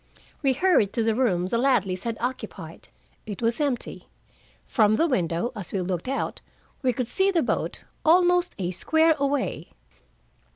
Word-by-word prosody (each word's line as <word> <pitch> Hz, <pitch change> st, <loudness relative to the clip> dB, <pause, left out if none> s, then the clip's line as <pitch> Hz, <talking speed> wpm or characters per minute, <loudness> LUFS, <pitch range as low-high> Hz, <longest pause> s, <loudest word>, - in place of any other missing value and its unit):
We 270 Hz, -3 st, +3 dB
hurried 275 Hz, -, +2 dB
to 230 Hz, -, 0 dB
the 225 Hz, 0 st, +2 dB
room 210 Hz, -8 st, +1 dB
the 230 Hz, +5 st, 0 dB
Ladleys 205 Hz, -8 st, +1 dB
had 230 Hz, -1 st, -2 dB
occupied. 250 Hz, +2 st, -6 dB, 0.4 s
It 205 Hz, -3 st, -6 dB
was 230 Hz, +4 st, +1 dB
empty. 275 Hz, -5 st, -3 dB, 0.6 s
From 215 Hz, -3 st, +3 dB
the 325 Hz, -, +2 dB
window, 175 Hz, -, 0 dB
as 200 Hz, -5 st, -7 dB
we 195 Hz, -, -1 dB
looked 180 Hz, +2 st, -3 dB
out, 270 Hz, +1 st, -3 dB, 0.4 s
we 260 Hz, -3 st, +2 dB
could 250 Hz, 0 st, -3 dB
see 380 Hz, +10 st, +2 dB
the 345 Hz, -4 st, +2 dB
boat, -, -, -2 dB, 0.2 s
almost 355 Hz, +2 st, +4 dB
a 180 Hz, -3 st, -2 dB
square 320 Hz, -, +3 dB
away. 280 Hz, -1 st, -2 dB
245 Hz, 160 wpm, -25 LUFS, 200-290 Hz, 0.6 s, almost